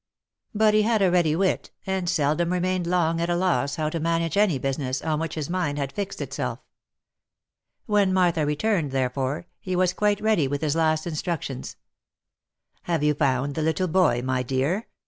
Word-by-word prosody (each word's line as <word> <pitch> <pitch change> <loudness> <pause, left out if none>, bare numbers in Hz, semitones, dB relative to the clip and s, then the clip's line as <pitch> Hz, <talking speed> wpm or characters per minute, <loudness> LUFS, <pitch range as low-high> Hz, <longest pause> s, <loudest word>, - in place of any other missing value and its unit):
But 215 0 +4
he 215 - +5
had 215 -1 +2
a 185 - +4
ready 170 -4 +3
wit, 190 +2 0 0.2
and 190 -2 -1
seldom 170 0 +1
remained 180 -1 0
long 170 -2 +1
at 170 - -1
a 175 - +2
loss 160 -7 +1
how 155 -1 -1
to 165 - -2
manage 165 0 0
any 200 -7 +3
business 130 0 -2
on 155 -1 0
which 165 -1 -3
his 155 -3 -3
mind 170 -5 -1
had 140 -1 -3
fixed 200 -1 -4
itself. - - -3 1.3
When 205 -4 +2
Martha 175 -4 +2
returned, 150 +2 0
therefore, 135 +3 -1
he 185 -1 -3
was 180 0 +2
quite 210 -1 +1
ready 215 -10 +2
with 140 +1 -3
his 150 -1 +1
last 155 -1 +1
in 170 - -4
structions. 155 - -4 0.5
" - - -47
Have 165 -3 +1
you 150 0 +3
found 140 -1 0
the 160 - -2
little 160 +4 0
boy, 160 -9 +2
my 130 0 0
dear 135 - -1
?" - - -53
165 Hz, 190 wpm, -25 LUFS, 145-185 Hz, 1.3 s, he